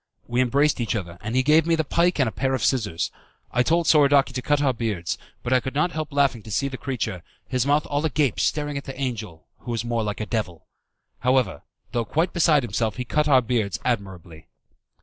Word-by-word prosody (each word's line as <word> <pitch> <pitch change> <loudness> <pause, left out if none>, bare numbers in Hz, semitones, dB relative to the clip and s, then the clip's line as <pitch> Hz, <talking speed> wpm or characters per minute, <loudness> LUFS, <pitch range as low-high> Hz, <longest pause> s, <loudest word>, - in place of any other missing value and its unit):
We 120 +1 0
embraced 140 +2 +2
each 115 - -1
other, 85 -4 -5
and 110 +4 -4
he 130 - +3
gave 155 +3 +4
me 165 - +4
the 160 - 0
pike 170 +4 +1
and 130 - +3
a - - -1
pair 135 +2 0
of 125 - -3
scissors. 105 -10 0 0.4
I 125 - +2
told 165 +6 +2
Soradaci 140 -4 +4
to 125 - -3
cut 145 +2 +1
our 140 -3 +2
beards, 110 -7 -3 0.2
but 125 - 0
I 130 - +5
could 130 +2 -6
not 155 +5 +2
help 155 -1 -4
laughing 140 -5 +2
to 110 - -12
see 140 +7 0
the 135 - -5
creature 120 -9 -3 0.3
his 130 0 0
mouth 145 +1 +3
all 145 +1 -1
agape 150 -5 +1
staring 145 -1 0
at - - -13
the 135 0 -8
angel, 110 -11 -4
who - - -10
was 115 -1 -2
more 120 -1 0
like 105 -1 -3
a 110 - -2
devil. 95 -6 -3 0.5
However, 125 - +1 0.3
though 120 - 0
quite 165 - 0
beside 160 -5 +4
himself, 115 -2 -1
he 125 - -4
cut 150 +4 +1
our 130 -3 +5
beards 110 -5 -1
admirably. 95 -9 -4
130 Hz, 225 wpm, -24 LUFS, 110-145 Hz, 0.5 s, I